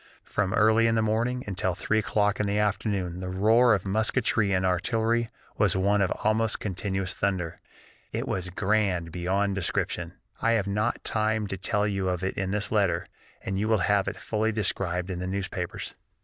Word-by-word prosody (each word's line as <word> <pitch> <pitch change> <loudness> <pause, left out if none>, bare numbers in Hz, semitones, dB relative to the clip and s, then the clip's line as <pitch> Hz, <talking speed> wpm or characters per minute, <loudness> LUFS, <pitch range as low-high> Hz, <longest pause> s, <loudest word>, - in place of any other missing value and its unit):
From 100 -2 -1
early 110 +2 +5
in 115 - +2
the 110 - +2
morning 120 +4 0
until 95 -2 -1
three 110 +4 +1
o'clock 105 -2 +1
in 105 - +1
the 100 +1 0
afternoon 100 -4 -1
the 95 0 -4
roar 110 +5 +4
of 100 - -4
musketry 110 0 +1
and 95 -1 +1
artillery 115 +5 +1 0.3
was 100 -4 +3
one 100 +2 +2
almost 110 +3 +1
continuous 95 -1 -3
thunder. 90 -5 -2 0.5
It - - -3
was 90 -1 -2
grand 95 -3 0
beyond 95 +4 0
description. 95 -3 -2 0.3
I 115 - +3
have 110 -4 +1
not 105 +4 -1
time 110 -1 0
to 95 - -2
tell 105 +2 0
you 95 -2 -1
of 90 0 -2
it 95 - -1
in 95 -1 -2
this 105 +1 -2
letter, 105 -4 +2 0.4
and 95 0 -2
you 105 - 0
will 110 0 +3
have 100 -1 +2
it - - -3
fully 110 0 -1
described 95 -3 -1
in 90 - -4
the 90 - -3
newspapers. 95 +1 -4
100 Hz, 180 wpm, -27 LUFS, 95-110 Hz, 0.5 s, early